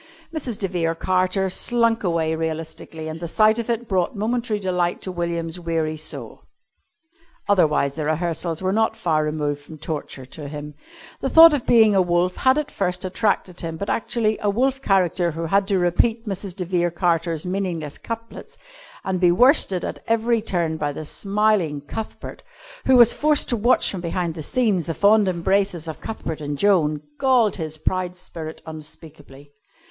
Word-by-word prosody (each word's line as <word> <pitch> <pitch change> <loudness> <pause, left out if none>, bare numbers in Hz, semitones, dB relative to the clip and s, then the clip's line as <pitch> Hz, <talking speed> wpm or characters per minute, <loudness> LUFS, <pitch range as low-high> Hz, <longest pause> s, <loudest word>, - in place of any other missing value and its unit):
Mrs. 255 -8 -3
de 200 - -2
Vere 165 -3 -1
Carter 185 +2 +1
slunk 230 +4 +1
away 165 -3 0
realistically, 160 0 -5
and 160 +1 -6
the 170 - -5
sight 215 +6 +3
of 235 - -4
it 235 0 -1
brought 185 -1 0
momentary 225 +1 -1
delight 180 -3 -1
to 185 - -4
William's 170 -1 -3
weary 165 -2 -1
soul. 155 0 -6 1.1
Otherwise 155 -8 +2
the 155 - -2
rehearsals 165 +2 -2
were 185 +1 +1
not 220 +1 +1
far 160 -8 +1
removed 150 -1 -2
from 155 +2 -12
torture 150 -4 -6
to 145 +3 -8
him. 150 +1 -7 0.5
The 270 - -2
thought 325 +1 +9
of 280 -5 -2
being 220 -3 +6
a 195 - +4
wolf 175 0 +1
had 260 +2 +3
at 300 -1 -2
first 180 -1 -2
attracted 190 -2 -1
him, 165 -1 -5
but 200 - -3
actually 220 -2 0
a 205 - +1
wolf 265 +6 0
character 185 -5 +2
who 165 +1 -4
had 195 +4 +2
to 195 - +1
repeat 220 +6 +1
Mrs. 195 -2 -4
de 180 - -4
Vere 175 -1 +1
Carter's 170 -1 -1
meaningless 180 -6 -3
couplets 230 0 -8 0.5
and 190 -1 -2
be 175 -1 +4
worsted 200 - +4
at - - -5
every 230 0 +2
turn 170 -6 -1
by 145 -2 -1
the 155 +2 -7
smiling 200 -5 0
Cuthbert, 215 +10 -7 0.5
who 260 -1 +6
was 235 -1 +7
forced 300 -1 +2
to 240 - +2
watch 240 +3 +3
from 190 - -5
behind 170 -1 -2
the 160 - -7
scenes 205 - 0
the 165 - -2
fond 205 0 +4
embraces 185 -1 0
of 160 - -7
Cuthbert 160 -8 -5
and 145 -1 -4
Joan, 155 -6 +2 0.2
galled 245 -7 +3
his 155 -3 -4
proud 180 +3 -2
spirit 160 -3 -8
unspeakably. 150 -2 -11
180 Hz, 175 wpm, -22 LUFS, 160-215 Hz, 1.1 s, thought